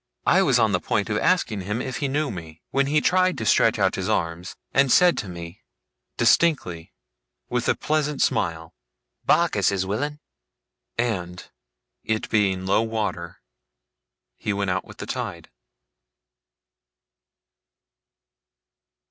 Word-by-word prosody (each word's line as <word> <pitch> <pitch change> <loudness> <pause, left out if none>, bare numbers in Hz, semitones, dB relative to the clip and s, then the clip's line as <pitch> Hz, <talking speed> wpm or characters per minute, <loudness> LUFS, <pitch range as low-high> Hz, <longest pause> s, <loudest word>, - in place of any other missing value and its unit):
I 190 - +5
was 135 -9 +3
on 110 -3 +3
the 90 - +1
point 100 +4 -1
of 105 - +1
asking 115 - +1
him 105 +5 -3
if 130 -1 -4
he 145 - -1
knew 145 +2 -1
me, 80 -4 -9
when 140 0 +2
he 150 +1 +2
tried 185 +1 +2
to 110 - -4
stretch - - +4
out - - +2
his - - -3
arm, 85 +1 -1 0.3
and 135 -1 +4
said 180 +4 +6
to 100 - -5
me, 85 +1 -9 0.6
distinctly, 115 - +2 0.6
with 120 -1 -1
a - - +3
pleasant 150 -2 -1
smile: 80 -1 0 0.5
'Barkis - - +3
is 95 -1 -1
willin'!' 145 +10 -3 0.8
And, 90 -7 -2 0.6
it 110 0 -1
being 95 -3 +1
low 100 +3 +3
water, 105 -7 -3 1.0
he 105 - -2
went 100 -2 -1
out 95 +1 -2
with - - -13
the - - -6
tide. - - -5
110 Hz, 135 wpm, -24 LUFS, 90-140 Hz, 1.0 s, said